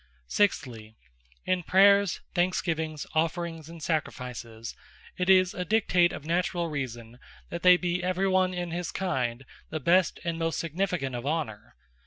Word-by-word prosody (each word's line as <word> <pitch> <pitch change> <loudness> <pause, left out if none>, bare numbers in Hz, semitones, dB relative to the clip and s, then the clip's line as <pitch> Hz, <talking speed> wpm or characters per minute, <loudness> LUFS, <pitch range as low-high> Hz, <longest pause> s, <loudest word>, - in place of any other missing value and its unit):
Sixthly, 115 - -1 0.5
in 185 -1 +1
Prayers, 200 +1 +4
Thanksgivings, 165 -4 -1
Offerings 165 0 -1
and 165 -2 -10
Sacrifices, 125 -8 -4 0.4
it 180 +1 -1
is 185 -1 +5
a 180 - -3
Dictate 180 -3 +3
of 150 - -8
naturall 170 0 0
Reason, 120 -4 -5 0.3
that 170 - -4
they 180 -1 +7
be 180 0 -2
every 185 +1 0
one 185 -1 +3
in 175 -2 -4
his 175 0 -3
kind 130 -9 -2 0.2
the 155 - -3
best, 175 +5 +3
and 170 -1 -2
most 165 0 -1
significant 165 -4 -2
of 120 +3 -5
Honour. 150 -9 -3
170 Hz, 145 wpm, -28 LUFS, 140-180 Hz, 0.5 s, they